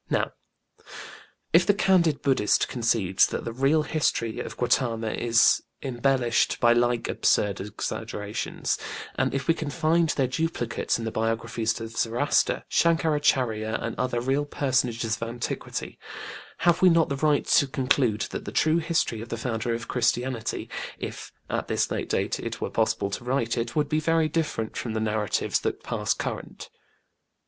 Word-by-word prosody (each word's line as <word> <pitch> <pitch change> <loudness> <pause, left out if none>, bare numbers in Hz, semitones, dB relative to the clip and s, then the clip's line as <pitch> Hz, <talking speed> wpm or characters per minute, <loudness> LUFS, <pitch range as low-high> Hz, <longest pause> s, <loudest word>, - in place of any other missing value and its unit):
Now, - - 0 1.2
if 170 +2 +7
the 200 +3 +3
candid 170 -8 +3
BudĖĢdĖĢhist 130 -7 +2
concedes 115 -6 +2
that - - -4
the 115 - -4
real 140 +5 +2
history 125 -8 -1
of - - -6
GautĖĢama 115 -3 0
is 115 -1 +4 0.2
embellished 125 -2 +1
by 120 0 +5
like 120 0 +1
absurd 100 -2 +1
exaggerations, 105 0 -3 0.3
and - - 0
if 135 -1 -3
we 165 - +5
can 155 -3 -4
find 165 +1 +2
their 135 - +1
duplicates 130 -3 -1
in 115 - -5
the 110 - -2
biographies 115 +1 -1
of 115 0 -7
Zoroaster, 120 +5 +1
ShanĖkarÄchÄrya 140 -9 +2
and 115 - -4
other 125 -2 0
real 135 +4 0
personages 125 -6 0
of - - -5
antiquity, 120 0 -5 0.7
have 175 0 +4
we 185 - +7
not 165 -1 +3
the 140 - -2
right 150 0 +2
to 140 - +4
conclude 130 -5 +1
that - - -5
the - - -5
true 155 +2 +3
history 160 -9 0
of 115 - -8
the 115 - -3
Founder 115 0 -2
of 115 +3 -6
Christianity, 120 0 -1 0.3
if - - -7 0.2
at - - -2
this - - 0
late - - -3
date - - 0
it - - -5
were - - -3
possible 100 - 0
to 110 - -4
write 120 -2 0
it, 120 0 -3
would 150 -2 +2
be 155 +1 +1
very 165 0 +2
different 150 -8 -2
from 115 - -3
the 110 - -1
narratives 110 -1 0
that - - -3
pass - - -1
current? - - -6
125 Hz, 160 wpm, -26 LUFS, 115-150 Hz, 1.2 s, if